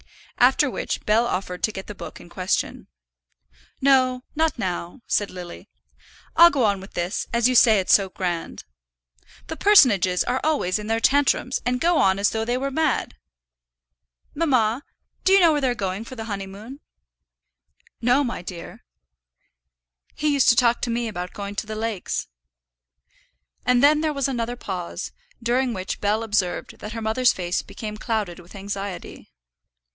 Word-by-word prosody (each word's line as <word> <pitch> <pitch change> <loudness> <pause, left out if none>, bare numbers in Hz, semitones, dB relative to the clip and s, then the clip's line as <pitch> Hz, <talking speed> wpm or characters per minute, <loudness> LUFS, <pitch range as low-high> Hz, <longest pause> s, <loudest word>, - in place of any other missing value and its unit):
After - - +4
which - - -4
Bell 225 +3 +3
offered 185 -2 -3
to 215 - +1
get 190 -2 -7
the 210 - -8
book - - -9
in - - -13
question. 185 +1 -2 0.9
"No, 255 -2 +3
not 320 -1 +1
now," 180 +2 -4
said 205 - 0
Lily. 180 -1 -9 0.7
"I'll 340 +1 +9
go 280 -6 0
on 200 -2 +1
with 195 - -12
this, 175 +4 -2
as 235 0 +3
you 255 - +1
say 225 -4 +6
it's 185 - +2
so 195 -2 +4
grand. 175 -3 -4 0.8
The 320 - -6
personages 225 - +5
are 255 +2 -1
always 245 -12 +1
in 210 - -7
their 225 0 +1
tantrums, 270 0 +2
and 250 0 0
go 340 +2 +2
on 190 0 +3
as 200 0 +2
though 220 0 -1
they 240 +2 -1
were 275 +2 -2
mad. 310 +1 0 1.2
Mamma, 255 -6 +1 0.4
do 380 - +4
you 390 - +7
know 340 -3 +6
where 295 -1 0
they're 255 -2 +1
going 195 0 -3
for 255 +3 -10
the 225 -2 -6
honeymoon?" 205 +5 -7 1.2
"No, 250 +4 +3
my 240 -8 -4
dear." 175 -1 -9 1.3
"He 300 0 0
used 280 -2 +4
to 235 - +6
talk 240 -2 +3
to 245 - -2
me 235 0 -1
about 180 -4 -5
going 200 0 -6
to 210 - -3
the 215 - -5
lakes." 220 -3 -3 1.4
And 250 +1 +4
then 300 +1 +5
there 310 -1 0
was 275 -2 0
another 240 -2 -2
pause, 185 -7 -5 0.3
during 245 +2 +1
which 185 +1 -5
Bell 210 +2 +1
observed 200 -5 -2
that 210 +1 -7
her 225 - -5
mother's 240 +3 +3
face 175 -1 -2
became 215 -1 -7
clouded 215 -6 -3
with 175 +3 -15
anxiety. 200 -1 -6
225 Hz, 165 wpm, -23 LUFS, 195-255 Hz, 1.4 s, I'll